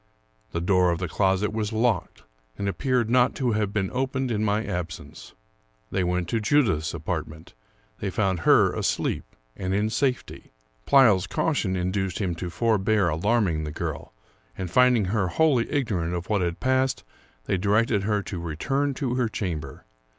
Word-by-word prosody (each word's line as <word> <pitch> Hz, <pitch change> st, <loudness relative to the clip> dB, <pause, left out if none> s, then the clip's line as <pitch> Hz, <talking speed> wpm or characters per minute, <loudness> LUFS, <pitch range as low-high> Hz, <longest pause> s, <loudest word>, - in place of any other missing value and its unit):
The 85 Hz, -, -2 dB
door 90 Hz, 0 st, +3 dB
of 85 Hz, -, 0 dB
the 90 Hz, 0 st, -3 dB
closet 95 Hz, +4 st, +1 dB
was 110 Hz, -1 st, -2 dB
locked, 110 Hz, -4 st, -1 dB, 0.3 s
and 100 Hz, -, -2 dB
appeared 120 Hz, +5 st, 0 dB
not 125 Hz, +1 st, +3 dB
to 125 Hz, -3 st, 0 dB
have 105 Hz, -2 st, 0 dB
been 95 Hz, -2 st, -1 dB
opened 130 Hz, 0 st, -1 dB
in 105 Hz, -2 st, 0 dB
m.y 105 Hz, +1 st, +1 dB
absence. 85 Hz, -2 st, -6 dB, 0.6 s
They 95 Hz, -, 0 dB
went 90 Hz, -1 st, -1 dB
to 115 Hz, -, 0 dB
Judith's 105 Hz, -, +1 dB
apart 80 Hz, 0 st, -3 dB
ment. 80 Hz, +1 st, -13 dB, 0.5 s
They 100 Hz, -, -2 dB
found 95 Hz, -3 st, 0 dB
her -, -, +4 dB
asleep -, -, -1 dB, 0.3 s
and 95 Hz, 0 st, -2 dB
in 105 Hz, +2 st, 0 dB
safety. 130 Hz, -, -2 dB, 0.3 s
Pleyel's 110 Hz, -9 st, +5 dB
cau 160 Hz, -, 0 dB
tion 95 Hz, -9 st, -1 dB
induced 95 Hz, 0 st, -1 dB
him 95 Hz, -4 st, -1 dB
to 90 Hz, +1 st, -5 dB
forbear 105 Hz, -1 st, +1 dB
alarming 85 Hz, -1 st, +1 dB
the 75 Hz, -, -4 dB
girl; -, -, -5 dB, 0.5 s
and, 90 Hz, -2 st, -5 dB
finding 125 Hz, -2 st, +4 dB
her 95 Hz, 0 st, 0 dB
wholly 130 Hz, -, +2 dB
ignorant 100 Hz, -, -1 dB
of 85 Hz, 0 st, -5 dB
what 100 Hz, -3 st, +2 dB
had 85 Hz, -1 st, -2 dB
passed, 130 Hz, 0 st, +1 dB, 0.4 s
they 95 Hz, -, 0 dB
directed 105 Hz, +2 st, +2 dB
her 105 Hz, 0 st, 0 dB
to 95 Hz, -, -5 dB
return 135 Hz, -, -1 dB
to 130 Hz, -3 st, -2 dB
her 125 Hz, -2 st, 0 dB
chamber. 90 Hz, -8 st, -5 dB
100 Hz, 170 wpm, -25 LUFS, 90-120 Hz, 0.6 s, Pleyel's